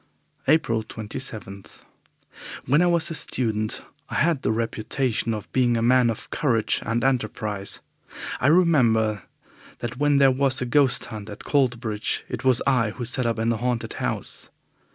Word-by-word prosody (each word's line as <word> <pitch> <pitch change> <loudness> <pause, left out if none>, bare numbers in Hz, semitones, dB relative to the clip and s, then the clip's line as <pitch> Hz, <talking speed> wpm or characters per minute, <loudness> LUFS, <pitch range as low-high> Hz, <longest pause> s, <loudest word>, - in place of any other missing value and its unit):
April 135 -7 +2
27. 110 -3 -7 1.0
When 145 +6 +3
I 180 - +4
was 170 -1 +2
a - - -2
student 110 -7 -1 0.3
I - - -5
had 155 -3 +2
the - - 0
reputation 115 +1 -1
of 105 -2 -5
being 120 -2 +2
a 115 - -1
man 125 0 +4
of 115 - -6
courage 115 -7 0
and 115 +2 -1
enterprise. 110 -6 -2 0.6
I 125 - +2
remember 120 - +3 0.6
that 120 0 -5
when 145 0 +3
there 135 -1 +6
was 130 0 +3
a 125 - -1
ghost 130 0 +5
hunt 110 -3 -8
at 105 - -9
Coltbridge 120 -6 0
it 120 - -5
was 130 -2 +3
I 125 -5 +2
who 120 +3 -6
sat 125 0 -1
up 115 - -1
in 115 +1 0
the 115 - +1
haunted 120 0 -2
house. - - -3
120 Hz, 160 wpm, -24 LUFS, 110-135 Hz, 1.0 s, there